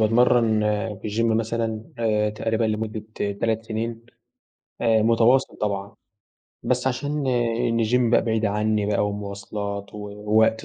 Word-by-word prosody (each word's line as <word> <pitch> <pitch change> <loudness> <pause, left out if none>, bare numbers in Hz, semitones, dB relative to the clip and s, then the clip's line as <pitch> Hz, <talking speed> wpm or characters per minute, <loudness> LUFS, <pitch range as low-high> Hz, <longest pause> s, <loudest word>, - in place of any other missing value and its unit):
باتمرن 115 0 +4 0.4
في - - -3
الGym 115 +3 0
مثلًا 115 -1 -1
آآ 105 -2 +1
تقريبًا 110 +1 -1
لمدة 110 0 -2 0.4
3 115 0 0
سنين 115 +1 -4 0.7
آآ 115 -2 +3
متواصل 115 +4 +3
طبعًا، 100 -1 -3 0.7
بس - - 0
عشان 145 +2 -1
إن 115 -1 +1
الGym 120 +1 +2
بقى - - +5
بعيد 110 -1 0
عني 105 0 0
بقى، 105 0 +1
ومواصلات، 100 0 -5
ووقت 105 +2 +1
110 Hz, 125 wpm, -24 LUFS, 105-115 Hz, 0.7 s, بقى